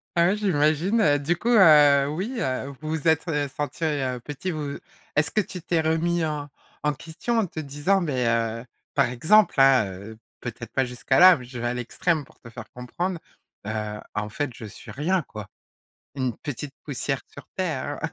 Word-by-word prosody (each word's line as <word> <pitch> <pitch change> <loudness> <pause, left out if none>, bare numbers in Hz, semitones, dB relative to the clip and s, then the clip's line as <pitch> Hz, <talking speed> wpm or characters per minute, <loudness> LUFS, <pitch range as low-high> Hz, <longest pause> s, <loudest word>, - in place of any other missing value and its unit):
Ah, 170 0 +4
ouais, 190 - +2
j'imagine, 175 +1 +2
heu, 145 -4 +4
du 165 +5 0
coup, 235 - -2
heu, 150 -10 +7
oui, 190 - -3
heu, 135 - -2
vous 155 - -5
vous 160 +1 -2
êtes, 160 +2 +3
heu, 150 -3 0
sentis, 150 +3 -4
heu, 135 -5 -1
petits 145 +8 -6
vous 150 -3 -4 0.4
est-ce 150 0 +2
que 215 - +2
tu 180 -2 -8
t'es 165 0 0
remis 165 +1 +1
en 150 -2 -4 0.3
en 150 0 +2
question 170 - -3
en 220 - +2
te 165 - -7
disant 150 +7 0
mais 135 -7 -1
heu, 115 0 0 0.3
par - - +3
exemple, 160 - +3
hein, 135 -4 +6
heu, 100 +3 -9 0.2
peut-être 120 -1 -7
pas 130 - +2
jusque 125 +1 -11
là, 180 +6 +8
mais 125 - -10
je 125 0 -8
vais 120 - -1
à 120 - -1
l'extrême 145 +6 -1
pour - - -23
te 120 - -13
faire 115 -1 -10
comprendre, 175 +9 -4 0.5
heu: 105 -1 -3 0.2
«En 105 0 -2
fait, 145 +4 -3
je 115 - -9
suis 105 +2 -12
rien 165 - 0
quoi»? 105 -6 -9 0.7
Une 130 -4 -1
petite 145 0 -6
poussière 135 -1 -3
sur 140 - -11
terre. 145 -6 -2
145 Hz, 195 wpm, -25 LUFS, 125-170 Hz, 0.7 s, là